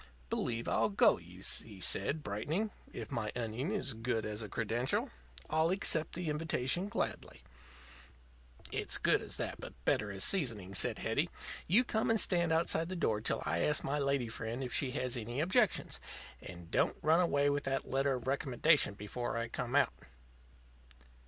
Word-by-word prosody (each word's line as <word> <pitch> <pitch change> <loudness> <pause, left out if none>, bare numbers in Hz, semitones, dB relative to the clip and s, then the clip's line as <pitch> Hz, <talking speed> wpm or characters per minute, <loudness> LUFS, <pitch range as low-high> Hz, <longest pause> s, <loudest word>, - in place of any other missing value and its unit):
"Believe 115 -1 -1
I'll 110 0 +2
go 100 - +4
you," - - -11 0.2
he 105 -4 -12
said, 120 - 0
brightening. 155 - -2 0.2
"If 110 -3 -7
my 105 -2 -2
onion 120 +5 -2
is 200 -11 -1
good 115 0 -2
as 105 +1 -4
a 105 - -6
credential, 115 +4 -1 0.4
I'll 160 +1 +2
accept 165 -4 +3
the 175 -1 -3
invitation 155 +3 +1
gladly." - - -4 1.3
"It's - - -2
good - - +3
as - - -6
that, - - -4
but - - -8
better 105 - +1
as 95 -1 -2
seasoning," 115 - +1
said 95 - +1
Hetty. - - 0 0.4
"You 210 +9 +5
come 220 -3 0
and 225 -1 +4
stand 170 -4 +2
outside 165 0 +1
the 185 - -4
door 110 -11 0
till 110 +1 -1
I - - 0
ask 150 0 +2
my 145 +2 -1
lady 140 -3 +1
friend 115 +3 -4
if 125 - -4
she 135 - +3
has 130 -3 -1
any 120 +2 -4
objections. 190 +8 +2 0.4
And 85 -1 -10
don't - - +2
run 160 +3 +5
away 145 -5 +3
with 145 0 -1
that 135 0 -1
letter 135 0 +1
of 125 - -6
recommendation 135 -2 +3
before 115 +4 -4
I 115 0 -2
come 125 +2 -3
out." 145 - +4
135 Hz, 170 wpm, -34 LUFS, 115-160 Hz, 1.3 s, You